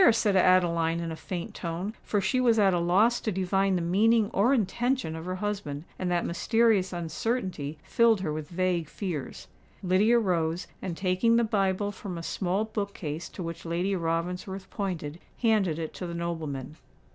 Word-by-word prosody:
said 215 -3 +2
Adeline 170 -3 +3
in 165 -1 -3
a - - -4
faint 175 +1 -5
tone—for 190 +5 -3
she 200 +7 +1
was 235 -2 +4
at 195 -3 +4
a 175 - +2
loss 195 +8 +3
to 215 - -1
divine 190 +1 +1
the 175 - 0
meaning 215 +5 +3
or 210 +7 +3
intention 245 -4 0
of 160 +1 -7
her 185 0 -3
husband; 185 -8 -3 0.2
and 185 - -1
that 175 -1 +1
mysterious 215 +1 +2
uncertainty 175 - -3
filled 230 -4 +3
her 155 -5 -2
with 155 -1 -5
vague 175 -3 0
fears. 175 -9 -5 0.4
Lydia 200 +6 +4
rose, 175 -5 0 0.2
and 175 -3 -4
taking 190 +5 +2
the 235 - +4
Bible 205 -2 0
from 190 -3 -7
a 165 - -6
small 190 +4 -1
book 205 -2 -4
case 155 0 -5
to 185 - -7
which 165 0 -6
Lady 175 +4 -1
Ravensworth 180 +3 -3
pointed, 175 -6 -4 0.2
handed 205 -8 +3
it 160 -1 -4
to 180 - -5
the 170 - -5
nobleman. 155 -4 -4
185 Hz, 175 wpm, -28 LUFS, 170-205 Hz, 0.4 s, was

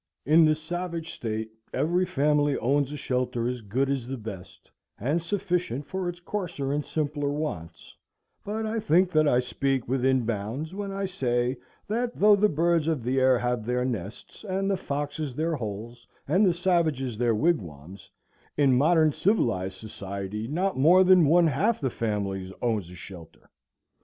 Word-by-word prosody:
In 160 +3 +6
the 155 0 +4
savage 165 +1 -5
state 110 -1 -4 0.2
every 175 +7 +1
family 145 -2 +2
owns 140 +2 +1
a 150 - -5
shelter 125 -3 -1
as 125 -1 -3
good 120 +7 -1
as 135 -3 -2
the 135 +1 -4
best, 105 -6 -10 0.3
and 145 +10 0
sufficient 180 - -2
for 190 +1 -3
its 175 0 -7
coarser 175 -7 -3
and 145 0 -1
simpler 145 -2 -2
wants; 90 - -5 0.5
but 220 +2 -3
I 220 +1 -1
think 180 -1 +3
that 155 -2 +3
I 125 -3 +4
speak 130 +1 -1
within 130 -1 +1
bounds 115 - -3
when 200 0 -4
I 195 0 -2
say 125 -8 -1 0.3
that, 235 +3 -1
though 210 +1 +6
the 210 +1 +3
birds 165 0 +1
of 155 -7 0
the 130 +3 +1
air 130 -1 +4
have 120 -1 -1
their 125 +2 -1
nests, 110 -5 -6
and 195 -1 -1
the - - +2
foxes 145 -4 -4
their 165 +3 0
holes, 115 +1 -7 0.2
and 185 +8 +4
the 180 - +3
savages 160 - 0
their 120 -2 +2
wigwams, 95 - -2 0.5
in 140 -3 +4
modern 155 +2 +4
civilized 95 - 0
society 100 +1 -6
not 180 +3 -1
more 175 +7 +6
than 185 -4 +6
one 170 +3 +5
half 180 - +1
the 130 -3 -1
families 100 -4 -3
own 115 -3 +1
a 90 -2 -11
shelter. 90 -2 -12
140 Hz, 165 wpm, -26 LUFS, 120-175 Hz, 0.5 s, In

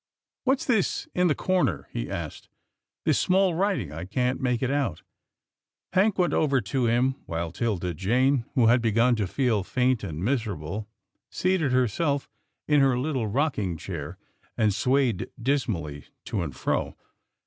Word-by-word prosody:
"What's 265 +1 +2
this 225 -7 +1
in 180 0 +3
the 150 - +2
corner?" 185 -1 0
he - - -4
asked, - - -6 0.6
"this - - +3
small 190 -1 +3
writing? 185 - 0
I 80 +4 -6
can't 125 +7 -1
make 125 -1 0
it 130 - +1
out." 140 - -1 0.9
Hank 195 +2 +3
went 180 -2 +2
over 140 -4 +3
to 120 +3 -1
him, 125 +3 +2
while 85 0 -3
'Tilda 90 -3 -1
Jane, 125 - +2
who 125 -4 +4
had 120 +2 +5
begun 115 +2 +3
to 105 -3 0
feel 115 -2 +1
faint 125 +2 +1
and 85 -1 -4
miserable, 105 - -2 0.4
seated 185 -7 +1
her 125 -1 +3
self 140 +4 -1 0.4
in 150 -1 +4
her 135 -2 +3
little 130 -4 -1
rocking 105 - 0
chair, 85 -1 -6 0.4
and 110 -3 +3
swayed 130 -3 +1
dismally 105 - -1 0.2
to 100 - -2
and 75 -7 -4
fro. - - -1
125 Hz, 155 wpm, -26 LUFS, 100-140 Hz, 0.9 s, had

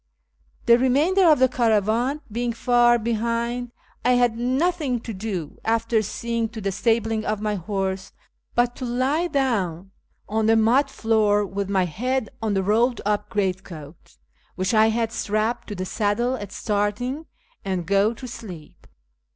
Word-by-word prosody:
The 235 0 +6
remainder 310 +9 +3
of 305 - +6
the 260 - +5
caravan 235 +3 +1
being 235 +2 -1
far 240 0 +4
behind, 235 +2 -2 0.3
I 250 - +4
had 245 -2 +3
nothing 265 +2 0
to 230 - -6
do, 190 -6 -5
after 225 0 +1
seeing 230 +2 -2
to 225 0 -8
the 195 -2 -2
stabling 225 +1 0
of 215 -1 -2
my 210 0 -1
horse, 190 0 -3 0.4
but 240 0 +2
to 255 - -4
lie 260 +8 0
down 200 - -1 0.4
on 220 +1 0
the 225 - +5
mud 230 +6 +3
floor 215 -2 +2
with 195 0 -4
my 190 -2 +2
head 240 - -2
on 215 -2 0
the 190 - +1
rolled 230 +5 +2
up 210 0 0
greatcoat 185 -7 -4 0.4
which 185 +4 -1
I 220 0 +5
had 225 0 0
strapped 215 +3 -1
to 205 - -5
the 185 0 -4
saddle 220 +5 0
at 205 -5 -7
starting, 235 +10 -2 0.4
and 185 -3 -2
go 200 +4 +3
to 255 +3 -8
sleep. 185 -10 -10
225 Hz, 155 wpm, -23 LUFS, 205-245 Hz, 0.4 s, The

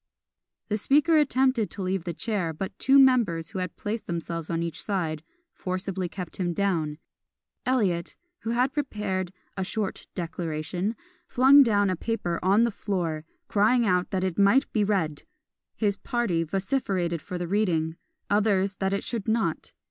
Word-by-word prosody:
The 210 0 0
Speaker 295 +8 +4
attempted 260 -6 +2
to 200 - -6
leave 185 -1 -1
the 170 - -3
chair, 195 -8 -1
but 190 +5 -5
two 270 +1 +5
members, 230 - +4
who 190 - -4
had 180 -3 -4
placed 215 +2 -4
themselves 165 -1 -4
on 165 -1 -1
each 170 0 -4
side, 165 -7 -2 0.3
forcibly 185 0 -3
kept 180 0 -7
him 175 -2 -1
down 165 -6 0 0.7
Eliot, 195 -10 +1 0.2
who 225 - -5
had 250 +3 +1
prepared 210 -10 -2 0.2
"a 190 - -2
short 205 +1 -3
declaration," 170 +4 -3 0.3
flung 270 +3 +7
down 205 -6 +3
a - - 0
paper 180 -3 -2
on 200 +5 +4
the 235 - +2
floor, 170 -7 -3 0.2
crying 225 +4 +3
out 180 -2 +2
that 185 -1 -1
it 190 0 -1
might 200 +8 +5
be 215 - +2
read! 175 -8 0 0.5
His 205 -2 0
party 235 -9 0
vociferated 190 - -1
for 180 - -5
the 175 -1 -3
reading 165 -5 +1 0.3
others 200 -2 +2
that 190 0 0
it 200 - -1
should 230 -4 -3
not. 220 0 0
195 Hz, 160 wpm, -26 LUFS, 175-225 Hz, 0.7 s, flung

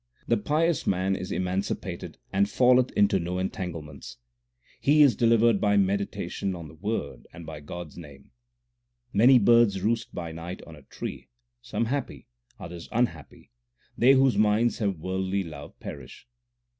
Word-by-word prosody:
The 115 - +3
pious 155 +8 0
man 95 +1 +1
is 95 -1 -6
emancipated 95 +2 -3 0.2
and 100 +1 +2
falleth 125 +2 +4
into 100 -1 +3
no 90 +1 -3
en 95 +1 -1
tanglements: 80 -7 -7 0.6
He 150 +2 +5
is 135 -7 +5
delivered 115 -2 +3
by 105 -1 +3
meditation 100 -1 -1
on 85 -2 -8
the - - -14
Word 85 -2 -4
and 85 - -11
by 80 -1 -8
God 85 +3 -8
s - - -18
name. 70 -5 -13 0.8
Many 125 +6 +6
birds 115 -3 +4
roost 115 +1 0
by 85 -2 -5
night 85 +3 -7
on 80 - -12
a 75 - -15
tree 65 - -8 0.3
Some 120 -1 -2
happy, 135 +3 -4 0.3
others 85 0 -9
unhappy 105 - -3 0.4
they 130 +3 +5
whose 130 -5 +3
minds 110 +3 +2
have 100 -5 -1
worldly 95 +3 -2
love 75 -4 -10
perish. - - -10
100 Hz, 155 wpm, -26 LUFS, 85-115 Hz, 0.8 s, Many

